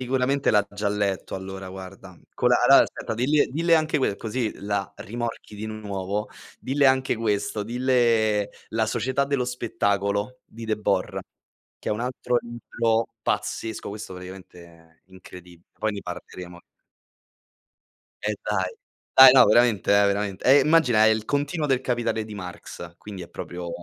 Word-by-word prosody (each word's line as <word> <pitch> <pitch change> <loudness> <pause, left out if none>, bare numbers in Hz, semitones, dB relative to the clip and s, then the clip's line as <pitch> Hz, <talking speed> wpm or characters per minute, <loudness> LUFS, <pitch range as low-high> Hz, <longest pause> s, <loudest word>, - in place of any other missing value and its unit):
Sicuramente 130 +2 +1
l'ha 105 -1 +4
già 100 0 -2
letto 100 -2 -2
allora, 95 0 -7
guarda. 95 0 -10 0.2
Con - - +2
la - - +6
allora, - - +8
aspetta, - - -5
dille 140 +6 +2
dille 165 +4 +2
anche 155 -1 +2
que 130 -7 0
così 115 0 -3
la 100 -1 -2
rimorchi 115 -1 -6
di 110 - -5
nuovo. 105 -2 -4 0.3
Dille 140 +2 +2
anche 130 -2 +2
questo, 105 -1 -1
dille: 115 -3 +2 0.2
"La 110 0 0
società 130 +4 0
dello 140 -2 0
spettacolo" 100 -2 -1
di 115 +1 -11
Debord, 105 -3 -1 0.6
che - - -5
è - - +1
un 105 - -2
altro 125 -1 -1
libro 115 -1 -1 0.2
pazzesco, 110 -1 -3
questo 105 -2 -7
praticamente 90 -1 -11
è 80 -1 -20
incredib 90 -2 -14 0.2
poi 110 - 0
ne 100 - -6
parleremo. 90 0 -9 1.6
Eddai. 105 -2 -2 0.4
Dai, 130 -1 +10
no, 130 -2 +7
veramente 110 -3 +3
eh, 100 0 +5
veramente. 100 -1 -2
E 135 +3 +7
immagina, 140 -7 +4
è - - +6
il 110 -1 +1
continuo 145 +4 -1
del 135 -3 +1
"Capitale" 120 -3 -1
di 110 -1 -9
Marx, 90 -2 -9
quindi 100 -2 -9
è 85 - -10
proprio 90 0 -7
110 Hz, 150 wpm, -24 LUFS, 100-125 Hz, 1.6 s, Dai